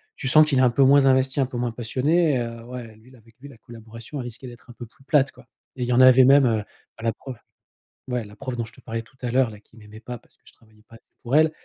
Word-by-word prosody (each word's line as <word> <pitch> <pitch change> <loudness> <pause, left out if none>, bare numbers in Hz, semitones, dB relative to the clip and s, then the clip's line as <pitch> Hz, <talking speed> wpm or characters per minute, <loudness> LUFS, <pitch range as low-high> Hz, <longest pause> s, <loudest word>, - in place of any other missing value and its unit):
Tu 135 - -5
sens 155 +3 +6
qu'il 140 -3 0
est - - +4
un 125 - +5
peu 135 +3 +2
moins 140 +1 +5
investi, 130 +1 +2
un 135 - +3
peu 125 -1 -7
moins 120 -1 -2
passionné, 135 +6 0
heu, 115 -1 -6
ouais, 120 -3 -9
lui 115 +4 -21
l 130 - -18
avec 115 0 -23
lui, 140 - -12
la 125 - -15
collaboration, 115 +4 -11
elle 125 - -5
risquait 120 +2 -9
d'être 120 +1 -14
un - - -11
peu 120 - -10
plus 135 - -25
plate, 145 -2 +2
quoi, - - -19 0.3
et 125 - -3
il - - -3
y 125 - 0
en 130 - +4
avait 130 0 +7
même, 140 0 +6
heu, 110 -3 0 0.3
bah, 115 - -12
la 115 -2 0
prof, 130 -2 -10 0.7
ouais, 125 -2 -3
la 105 0 -14
prof 130 -2 -6
dont 120 - -3
je 110 - -7
te - - -18
parlais 115 0 -5
tout 130 +3 -22
à 125 - -3
l'heure 130 -2 +2
là, 105 -1 -12
qui 110 - -26
m'aimait 105 0 -14
pas 120 +1 -8
parce - - -27
que - - -49
je - - -18
travaillais 110 -1 -26
pas 115 - -16
assez - - -22
pour 125 +4 -2
elle, 155 0 +4
125 Hz, 310 wpm, -23 LUFS, 115-135 Hz, 0.7 s, avait